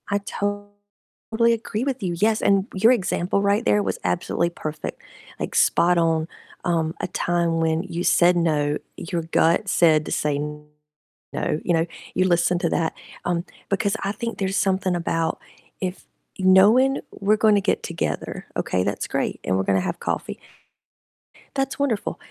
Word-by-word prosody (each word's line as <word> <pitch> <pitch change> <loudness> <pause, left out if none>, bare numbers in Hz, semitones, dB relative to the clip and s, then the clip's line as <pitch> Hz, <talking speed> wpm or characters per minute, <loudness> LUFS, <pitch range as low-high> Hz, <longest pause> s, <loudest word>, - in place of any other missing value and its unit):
I 200 0 +1
totally 205 +3 -3
agree 225 0 -3
with 265 -2 -2
you, 180 -3 -2
yes, 215 +2 +2
and 195 0 +3
your 220 +5 +5
example 195 -4 0
right 200 +1 +2
there 105 0 +3
was 95 -2 -2
absolutely 90 - 0
perfect, 155 -3 -6 0.4
like, - - -4
spot 175 +1 +4
on, 165 -1 +2 0.4
um, 165 -2 0
a - - -2
time 170 -1 0
when 160 +1 +1
you 175 -2 -4
said 175 0 +4
no, 150 -3 +1 0.2
your 170 -1 -4
gut 165 +4 +2
said 160 -4 +4
to - - -6
say 150 -1 0
no, 150 0 -6
you 175 - +1
know, 165 0 +2 0.3
you 185 - +2
listened 175 0 +2
to 170 - +1
that, 160 -1 0 0.3
um, 175 0 -1 0.2
because 200 +1 0
I 195 - 0
think 230 +3 -5
there's 195 0 -1
something 190 -1 +1
about 165 -1 -1 0.4
if 185 0 -4 0.3
knowing 210 +9 +5
we're 210 +2 +1
gonna 210 -1 +4
get - - 0
together, - - -4
okay, 90 - 0
that's - - -2
great, - - -2
and 95 - 0
we're 95 - +1
gonna 95 0 +2
have - - -3
coffee - - -3 1.2
that's 270 -1 -1
wonderful, 260 -7 -1
180 Hz, 160 wpm, -23 LUFS, 160-205 Hz, 1.2 s, your